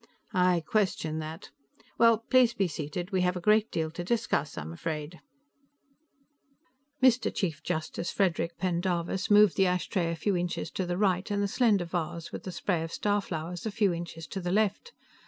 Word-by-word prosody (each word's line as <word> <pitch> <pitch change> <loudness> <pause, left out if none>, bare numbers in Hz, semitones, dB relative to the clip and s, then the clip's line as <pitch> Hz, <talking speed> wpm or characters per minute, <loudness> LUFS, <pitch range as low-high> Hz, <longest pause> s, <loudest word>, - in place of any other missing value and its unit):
"I 180 -1 +3
question 170 -7 0
that. 160 +1 -7 0.5
Well, 230 -1 +6
please 250 -2 +4
be 195 -5 +1
seated. 165 +4 -5
We 190 -1 +1
have 180 0 +1
a - - -2
great 215 +4 +3
deal 160 -1 -2
to 175 +2 -5
discuss, 220 -7 -1
I'm 80 +2 -5
afraid." 155 - -5 1.8
Mr. 255 -1 +4
Chief 165 -7 -2
Justice 170 0 -3
Frederic 170 -3 0
Pendarvis 180 0 -1
moved 210 -1 +6
the 190 -1 +4
ashtray 180 -1 0
a - - -2
few 195 +4 0
inches 175 0 -2
to 185 - -3
the 175 0 -1
right 190 -1 +1
and 205 0 0
the - - +1
slender 205 -4 +2
vase 170 -1 -4
with - - -7
the 185 - -4
spray 175 -2 -1
of 165 0 -5
starflowers 180 -3 -2
a - - -2
few 200 -3 +2
inches 170 -1 -6
to 195 - -4
the 175 0 -2
left. 215 - 0
180 Hz, 175 wpm, -29 LUFS, 170-205 Hz, 1.8 s, Well